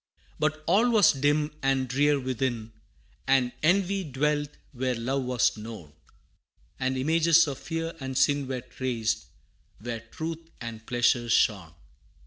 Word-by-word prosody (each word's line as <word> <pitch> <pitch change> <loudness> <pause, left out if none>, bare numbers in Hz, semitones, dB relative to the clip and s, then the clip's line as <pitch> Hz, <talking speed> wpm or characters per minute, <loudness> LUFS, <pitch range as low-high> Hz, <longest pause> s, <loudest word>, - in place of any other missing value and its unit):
But 155 0 0
all 210 +8 +4
was 220 -4 +6
dim 150 +2 +1
and 135 -1 +1
drear 145 +3 +2
within, 125 -3 -3 0.5
And 130 -2 +3
envy 195 +4 +2
dwelt 145 0 -1 0.2
where 130 -1 -1
love 130 +3 -2
was 125 -3 +2
known, 105 -9 -9 0.9
And 130 0 -1
images 165 +4 +4
of 140 -3 -5
fear 165 0 -4
and 130 -1 -4
sin 145 0 +2
Were 130 -1 -3
traced, 120 -3 -2 0.5
where 115 +1 -5
truth 160 +8 -7
and 115 -2 -7
pleasure 120 0 +2
shone. 95 -7 +2
135 Hz, 130 wpm, -27 LUFS, 120-155 Hz, 0.9 s, was